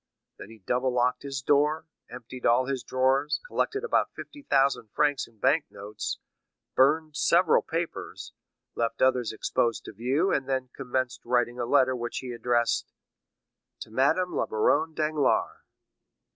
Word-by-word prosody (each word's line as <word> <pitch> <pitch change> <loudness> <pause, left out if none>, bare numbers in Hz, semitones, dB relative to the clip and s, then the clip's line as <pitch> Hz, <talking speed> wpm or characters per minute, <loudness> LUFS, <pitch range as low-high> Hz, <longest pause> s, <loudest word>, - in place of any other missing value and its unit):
Then - - -10
he 115 - -13
double 125 +6 -1
locked 125 0 +1
his 135 -2 -5
door, 150 +3 +2 0.2
emptied 125 +1 -10
all 120 +2 +4
his 135 -1 -2
drawers, 135 +4 +1
collected 425 -3 -1
about 470 - +1
fifty 290 - -10
thousand 135 - +1
francs 145 -2 +1
in 115 - -24
bank 135 +8 +2
notes, 105 +1 -5 0.6
burned 155 +3 +3
several - - +4
papers, - - -5 0.4
left 115 0 -1
others 130 -3 +2
exposed 115 +1 -1
to - - -7
view, 130 - 0
and 135 -1 -1
then 130 -1 -1
commenced 130 -1 -2
writing 120 0 0
a 120 - -1
letter 130 -1 +3
which 120 -1 -4
he 130 -2 -5
addressed: 120 -1 0 0.9
"To - - -8
Madame 160 +10 +2
la - - 0
Baronne 155 +9 +1
Danglars." 155 -3 +1
130 Hz, 145 wpm, -27 LUFS, 120-145 Hz, 0.9 s, all